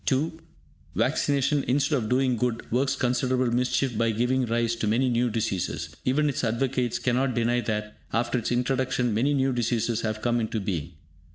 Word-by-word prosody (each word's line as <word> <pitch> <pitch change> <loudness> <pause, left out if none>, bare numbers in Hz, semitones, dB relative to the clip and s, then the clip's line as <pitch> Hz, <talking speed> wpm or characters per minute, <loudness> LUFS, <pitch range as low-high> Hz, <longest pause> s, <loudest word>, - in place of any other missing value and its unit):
(2) 155 +4 0 0.6
Vaccination, 140 0 +1
instead 145 +4 +2
of 110 -5 -1
doing 130 0 +2
good, 120 -1 -1
works 130 +3 +1
considerable 125 0 +1
mischief 125 0 +1
by 115 +1 +2
giving 125 +3 +1
rise 115 0 +1
to 115 -2 -2
many 120 +5 +2
new 120 0 +2
diseases. 110 -5 -2
Even 150 +4 +2
its 140 - -1
advocates 125 +1 0
cannot 130 0 0
deny 120 +1 +1
that, 105 -1 -3 0.2
after 120 +2 0
its 115 - -3
introduction, 125 -1 0
many 125 +7 +2
new 135 -1 +1
diseases 120 -1 0
have 110 -1 -3
come 120 0 +2
into 110 -1 -2
being. 90 -5 -3
120 Hz, 170 wpm, -26 LUFS, 115-130 Hz, 0.6 s, instead